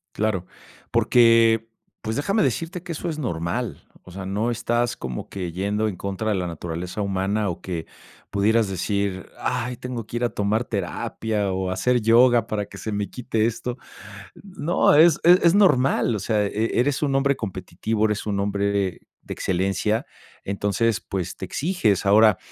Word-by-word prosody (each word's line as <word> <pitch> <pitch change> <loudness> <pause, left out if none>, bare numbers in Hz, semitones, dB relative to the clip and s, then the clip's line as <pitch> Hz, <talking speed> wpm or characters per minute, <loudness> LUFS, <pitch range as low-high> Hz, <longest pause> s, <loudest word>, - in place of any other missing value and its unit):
Claro, 100 -4 -1 0.5
porque, 115 -2 +4 0.3
pues 110 +3 -3
déjame 200 +8 +1
decirte 175 +1 -2
que 175 - -7
eso 165 - -4
es 155 -2 -3
normal, 85 - -3 0.2
o 90 - -13
sea, 95 +1 -7
no 105 +5 -1
estás 120 +1 -1
como 65 -2 -6
que 90 -3 -5
yendo 105 +4 -1
en 100 - -3
contra 100 +4 -3
de 105 - +1
la 90 -1 -2
naturaleza 85 +4 -5
humana 100 +2 0
o 85 - -5
que, 85 -3 -4 0.4
pudieras 110 +2 +2
decir: 95 0 -2
"Ay, 125 +2 -2
tengo 125 -3 -5
que 120 - -5
ir 120 - -2
a 120 - +2
tomar 105 +3 0
terapia 100 +1 -2
o 95 0 -2
hacer 120 +7 +1
yoga 115 +1 +5
para 105 -1 -2
que 100 - -12
se 110 - -5
me 105 0 -2
quite 115 -3 -1
esto". 120 +2 -3 0.7
No, 180 -4 +1
es 160 0 +6
es 180 +2 +7
es 170 - +5
normal, 135 - +3
o - - -2
sea, 105 +1 +1
e 110 +4 -1
eres 140 +3 +1
un 140 -2 +1
hombre 140 0 +2
competitivo, 105 +2 -2
eres 105 -1 -1
un 100 -1 -1
hombre 100 0 0 0.5
de - - -6
excelencia, 95 +4 0 0.4
entonces 100 +3 0
pues, 90 -2 -4
te 95 - -5
exiges, 115 - 0
ahora, 105 0 +6
110 Hz, 170 wpm, -23 LUFS, 95-120 Hz, 0.7 s, es